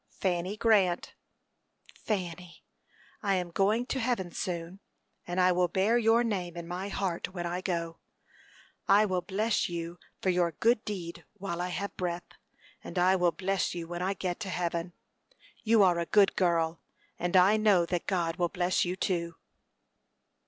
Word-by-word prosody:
"Fanny 185 +2 -1
Grant." 200 -6 +2 0.8
"Fanny, 180 -4 -5 0.6
I 200 -2 +1
am 180 -2 -2
going 210 +7 +2
to 265 - -2
heaven 225 -7 -1
soon, 175 +2 -4 0.5
and 175 +1 -2
I 185 0 +5
will 180 0 +2
bear 195 +6 +2
your 230 +1 +4
name 180 -7 -3
in 170 -1 -6
my 180 +3 -4
heart 190 -1 -3
when 175 -1 -3
I 175 +1 -2
go. 170 -3 -3 0.9
I 205 +2 +6
will 185 -3 0
bless 205 +4 0
you 170 0 -5 0.2
for 190 - 0
your 175 -2 +1
good 230 +5 +2
deed 180 -5 -5
while 175 -3 -4
I 180 - -1
have 200 +3 -4
breath, 175 -1 -3 0.6
and - - -8
I 185 +2 +4
will 175 -2 +3
bless 190 +3 -1
you 170 -1 -5
when 175 +1 -5
I 190 +2 0
get 180 -1 -3
to 205 -4 -5
heaven. 170 -1 -2 0.7
You 225 -2 +4
are 175 -2 +4
a 170 - -2
good 205 -2 +4
girl, 165 -2 +1 0.4
and 175 +2 +2
I 190 +4 +6
know 205 -5 +4
that 175 0 -3
God 170 -3 0
will 175 -2 +1
bless 180 +1 +1
you 180 +1 -2
too." 170 -3 -2
180 Hz, 165 wpm, -29 LUFS, 175-195 Hz, 0.9 s, I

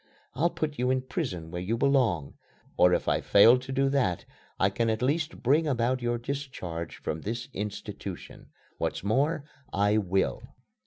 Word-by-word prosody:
I'll 160 +7 +2
put 150 -4 -3
you 125 +1 +1
in 130 0 +1
prison 100 - -4
where 90 0 -4
you 110 +6 -1
belong. 120 - +2 0.4
Or 90 - +5
if - - +1
I - - +2
fail 115 +5 +6
to 130 +1 -8
do 135 0 +2
that, 125 -11 0 0.3
I 95 +1 +3
can 115 +3 0
at 110 +1 -1
least 150 +3 -1
bring 150 +6 +3
about 125 -1 +1
your 120 0 0
discharge 120 - -5
from 80 - -4
this 115 +6 -4
institution. 105 0 -6 0.3
What's - - -2
more, 140 +9 +1 0.3
I 105 +2 +2
will." 95 - 0
120 Hz, 165 wpm, -28 LUFS, 95-135 Hz, 0.4 s, fail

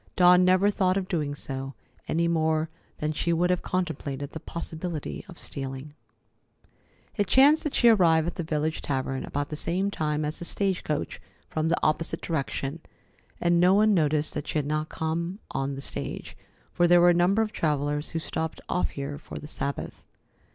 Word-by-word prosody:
Dawn 180 0 +7
never 185 +3 +4
thought 185 -2 +2
of 190 -1 -2
doing 150 -6 -1
so, 135 -1 -6 0.3
any 170 +1 +1
more 160 -1 +1 0.3
than 150 0 -1
she 155 +2 -1
would 175 +2 +2
have 180 - +1
contemplated 145 -6 -3
the 160 - -6
possibility 165 -1 -5
of 175 - -11
stealing. 135 +1 -6 1.2
It 205 -2 +1
chanced 285 +7 +6
that 300 - -2
she 240 - +5
arrived 170 -8 +5
at 170 - -2
the - - -4
village 155 0 -1
tavern 130 -1 -2
about 145 0 -3
the 150 - -4
same 185 +6 0
time 150 -3 -1
as 150 +1 -3
the 175 - -5
stage 195 0 -1
coach 150 -1 -3 0.3
from 155 0 -1
the 165 - +2
opposite 155 +2 +1
direction, 140 -1 -2 0.6
and 175 0 +3
no 180 +2 +5
one 215 +1 +5
noticed 155 -3 +1
that - - -4
she - - -1
had 150 - 0
not 155 +1 -1
come 170 +3 -2
on 135 +1 -2
the 135 - -6
stage, - - -5 0.4
for 175 - +3
there 175 0 +7
were 175 0 +7
a - - +4
number 180 +6 +3
of 215 - -4
travellers 150 -2 -1
who 165 - -4
stopped 160 0 -3
off 180 - 0
here 140 +1 -5
for - - -9
the - - -8
Sabbath. 140 -1 -4
160 Hz, 185 wpm, -27 LUFS, 150-180 Hz, 1.2 s, Dawn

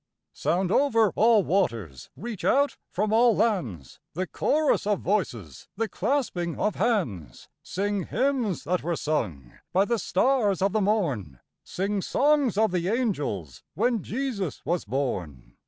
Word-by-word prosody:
Sound 180 +1 0
over 225 -6 +3
all 220 -2 +5
waters, 115 - -1
reach 225 -3 -7
out 280 -1 +3
from 210 +4 -1
all 235 0 +5
lands, 130 - -1 0.2
The 185 +2 -1
chorus 300 - +1
of 205 -2 +1
voices, 125 - -2
the 225 +1 0
clasping 185 - -1
of 210 - +1
hands; 125 - -2
Sing 200 0 -2
hymns 255 - 0
that 180 +4 0
were 170 0 -1
sung 85 - -3
by 190 +3 +3
the 235 +1 0
stars 210 -1 +2
of 195 - +2
the 215 - +1
morn, 145 - -1 0.2
Sing 200 +2 -2
songs 280 -2 +2
of 220 -2 +3
the 175 -1 -1
angels 150 - -2
when 230 +4 +1
Jesus 220 - -4
was 175 0 -1
born! 90 - -4
195 Hz, 140 wpm, -26 LUFS, 150-225 Hz, 0.2 s, all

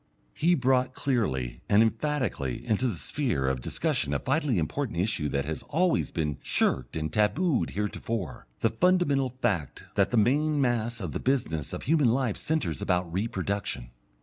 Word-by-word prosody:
He 175 +3 +3
brought 130 -1 +2
clearly 65 - -1
and 105 +2 +6
emphatically 115 - -1
into 110 +4 +1
the 110 - -1
sphere 85 - -1
of 65 -1 0
discussion 70 +3 -1
a - - +4
vitally 135 - 0
important 90 - -2
issue 85 -5 0
that 70 0 -1
had 80 +1 -4
always 175 +3 +2
been 75 -5 -2
shirked 60 -2 0
and 80 -1 -3
tabooed 135 - +2
heretofore, 105 - -3
the 115 - +3
fundamental 145 -2 +2
fact 100 - -2
that 100 - +2
the 120 - 0
main 145 +7 +3
mass 120 -3 0
of 90 -5 -4
the - - -3
business 80 - -1
of - - -5
human 150 -2 +3
life 125 -3 +1
centres 120 - -1
about 90 -2 0
reproduction. 100 - -2
110 Hz, 160 wpm, -28 LUFS, 80-135 Hz, -, and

